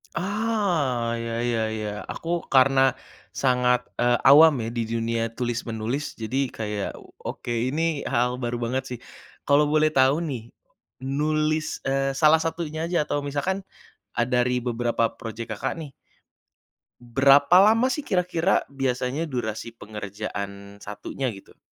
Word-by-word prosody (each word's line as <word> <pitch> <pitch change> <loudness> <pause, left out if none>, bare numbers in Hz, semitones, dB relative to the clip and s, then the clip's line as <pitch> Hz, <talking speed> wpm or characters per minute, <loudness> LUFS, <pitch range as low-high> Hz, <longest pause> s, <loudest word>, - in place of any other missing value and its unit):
Ah, 180 - 0
ya 115 0 -3
ya 120 -2 0
ya. 110 -1 -3 0.2
Aku 170 0 -3
karena, 135 0 +5 0.5
sangat, 125 -2 +1
eee, 120 0 +2
awam 155 +2 +9
ya 115 - -3
di 120 -1 -1
dunia 115 0 -1
tulis 120 0 -3
menulis. 115 +6 -4
Jadi 130 +4 -1
kayak 105 -2 -4
o - - -17 0.2
oke - - -17
ini 140 +6 0
hal 125 +1 0
baru 120 0 -2
banget 125 +3 -1
sih. 125 - -5 0.5
Kalau 145 +1 +5
boleh 155 0 +4
tahu 135 +2 +4
nih, 120 -6 -6 0.5
nulis, 155 +3 -1
eee, 135 0 +1
salah 155 +3 +4
satunya 160 -1 -3
aja 160 -4 +1
atau 145 -1 -1
misalkan, 145 +8 -2 0.5
a 120 - +1
dari 125 0 +1
beberapa 120 -1 0
project 115 -1 -6
Kakak - - -2
nih. 150 -4 -8 1.1
Berapa 140 +6 +5
lama 225 +6 +5
sih 290 +2 -3
kira-kira 180 -1 +1
biasanya 135 +2 -1
durasi 115 -5 -4
pengerjaan 100 -1 -7
satunya 110 +5 -5
gitu? 95 - -15
130 Hz, 135 wpm, -25 LUFS, 115-155 Hz, 1.1 s, awam